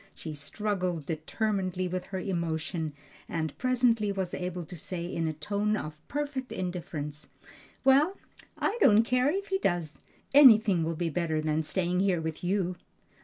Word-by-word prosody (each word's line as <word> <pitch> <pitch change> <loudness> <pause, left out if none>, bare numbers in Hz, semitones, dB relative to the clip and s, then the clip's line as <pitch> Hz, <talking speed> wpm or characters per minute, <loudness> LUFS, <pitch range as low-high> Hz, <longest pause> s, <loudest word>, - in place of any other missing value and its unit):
She 160 - -6
struggled 180 +2 -2
determinedly 185 +3 -1
with 180 0 -3
her 190 - -5
emotion, 170 -4 -2 0.4
and 160 -3 -2
presently 245 -4 +2
was 190 -2 -3
able 180 -1 -4
to 180 - -9
say 170 +1 -5
in 165 -2 -2
a 155 - -1
tone 205 +7 -1
of 155 -3 -7
perfect 280 -3 -3
indifference: 160 -5 -5 0.6
"Well, 285 +8 +4 0.4
I 450 +4 -1
don't 215 - +7
care 250 +3 +2
if 395 +5 -2
he 385 0 +1
does; 175 - -1 0.3
anything 220 - +7
will 165 +1 -1
be 165 0 -1
better 160 -1 0
than 155 0 0
staying 180 +2 0
here 190 -3 +2
with 160 0 -4
you." 180 -1 0
180 Hz, 155 wpm, -29 LUFS, 160-215 Hz, 0.6 s, don't